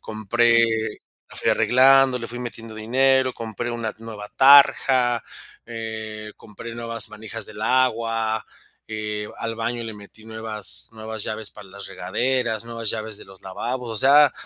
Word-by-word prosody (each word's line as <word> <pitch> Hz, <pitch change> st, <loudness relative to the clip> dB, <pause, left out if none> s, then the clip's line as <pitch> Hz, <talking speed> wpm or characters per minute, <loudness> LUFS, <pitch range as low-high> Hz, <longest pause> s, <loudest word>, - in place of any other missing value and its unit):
compré 115 Hz, +2 st, +2 dB, 0.7 s
la -, -, -12 dB
fui -, -, +1 dB
arreglando, 130 Hz, 0 st, +5 dB
le 115 Hz, -, -5 dB
fui 120 Hz, -, -6 dB
metiendo 115 Hz, -2 st, -7 dB
dinero, 130 Hz, +3 st, +2 dB
compré 115 Hz, +1 st, -5 dB
una 115 Hz, -2 st, -3 dB
nueva 110 Hz, -2 st, -8 dB
tarja, 130 Hz, -3 st, +6 dB, 0.4 s
eh, 110 Hz, -2 st, -6 dB
compré 115 Hz, +2 st, -10 dB
nuevas 115 Hz, -1 st, -1 dB
manijas 110 Hz, 0 st, -5 dB
del 105 Hz, 0 st, -8 dB
agua, 115 Hz, -3 st, +1 dB, 0.4 s
eh, 105 Hz, -1 st, -4 dB
al 115 Hz, 0 st, -3 dB
baño 115 Hz, +1 st, -2 dB
le 115 Hz, -1 st, -6 dB
metí 105 Hz, +1 st, -14 dB
nuevas 110 Hz, -2 st, -1 dB
nuevas 110 Hz, -1 st, -6 dB
llaves 110 Hz, 0 st, -4 dB
para 105 Hz, -2 st, -13 dB
las 100 Hz, +1 st, -9 dB
regaderas, 125 Hz, -4 st, -1 dB
nuevas 115 Hz, -2 st, -4 dB
llaves 110 Hz, -1 st, -5 dB
de -, -, -7 dB
los 95 Hz, -1 st, -15 dB
lavabos, 120 Hz, +6 st, -4 dB
o 110 Hz, -, -4 dB
sea, 140 Hz, +4 st, +6 dB
115 Hz, 150 wpm, -23 LUFS, 110-120 Hz, 0.7 s, tarja